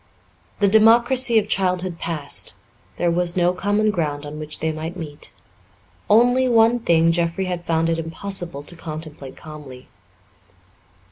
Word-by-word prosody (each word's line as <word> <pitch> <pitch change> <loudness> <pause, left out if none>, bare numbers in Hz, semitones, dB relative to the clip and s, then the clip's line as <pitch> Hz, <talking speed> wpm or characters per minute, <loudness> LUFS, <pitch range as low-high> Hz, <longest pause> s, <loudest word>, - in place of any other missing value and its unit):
The 200 - +2
democracy 235 +3 +4
of 210 -1 +2
childhood 185 -3 -1
past, 155 -4 -2 0.4
there 175 -1 0
was 175 +1 0
no 175 0 +2
common 205 +3 0
ground 150 -6 -3
on 150 +1 -8
which 155 0 -5
they 160 - -1
might 160 +3 -6
meet. 150 -4 -9 0.8
Only 245 +4 +4
one 230 +1 +4
thing 165 -6 +3
Jeffrey 170 +2 -1
had 175 -1 -4
found 165 0 0
it 165 0 -1
impossible 170 -2 -3
to 175 - -4
contemplate 155 -4 -9
calmly. 145 -5 -12
170 Hz, 140 wpm, -21 LUFS, 160-205 Hz, 0.8 s, democracy